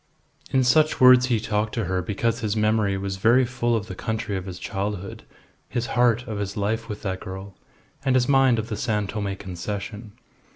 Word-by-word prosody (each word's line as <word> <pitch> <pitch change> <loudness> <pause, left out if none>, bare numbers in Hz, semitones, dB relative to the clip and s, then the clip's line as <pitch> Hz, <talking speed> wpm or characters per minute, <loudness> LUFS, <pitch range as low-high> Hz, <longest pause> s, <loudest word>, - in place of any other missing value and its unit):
In 130 -1 +2
such 155 +5 +3
words 125 -1 +7
he 120 -3 +1
talked 105 0 -1
to 115 - -1
her 95 -1 -1
because 115 +5 -1
his 110 -2 -1
memory 105 -2 +2
was 95 0 -4
very 120 +6 +4
full 120 -1 0
of 110 -2 -2
the 95 - -7
country 110 +2 -3
of 95 0 -4
his 90 -2 -6
childhood, 100 0 -4 0.5
his 120 -1 -2
heart 120 0 +3
of 110 -3 -4
his 100 0 -4
life 110 +3 -1
with 105 -1 -6
that 95 -2 -2
girl, 95 +1 -8 0.5
and 130 -1 +2
his 125 -1 +3
mind 135 -3 +4
of 110 0 -3
the 105 - -3
San 105 -3 0
Tome 100 -1 -3
Concession. 105 +3 -6
110 Hz, 200 wpm, -24 LUFS, 100-120 Hz, 0.5 s, words